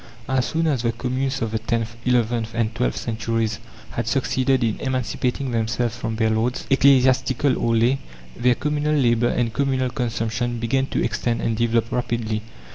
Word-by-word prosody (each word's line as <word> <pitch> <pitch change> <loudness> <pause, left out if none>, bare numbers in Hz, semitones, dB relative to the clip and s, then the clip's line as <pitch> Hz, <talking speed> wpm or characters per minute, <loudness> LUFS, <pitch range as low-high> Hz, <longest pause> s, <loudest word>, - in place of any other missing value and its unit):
As 130 -1 +1
soon 165 0 0
as 140 -7 +1
the 115 -1 0
communes 130 +2 -2
of 110 - -2
the 110 - -1
tenth, 115 0 -2
eleventh, 115 -2 +1
and 115 -1 0
twelfth 125 +2 -1
centuries 115 -1 -2 0.3
had 115 -1 -3
succeeded 130 0 +1
in 110 -2 0
emancipating 130 0 -1
themselves 115 +1 -1
from 115 -2 -3
their 110 0 +1
lords, 115 +3 0
ecclesiastical 130 0 +4
or 115 -1 +1
lay, 120 +4 +3 0.4
their 125 0 +3
communal 150 +2 0
labour 120 -3 +3
and 115 -2 0
communal 130 0 0
consumption 120 -1 -2
began 130 +4 0
to - - -1
extend 115 +1 -1
and 115 - 0
develop 115 0 +1
rapidly. 115 -3 -1
120 Hz, 165 wpm, -22 LUFS, 115-130 Hz, 0.4 s, ecclesiastical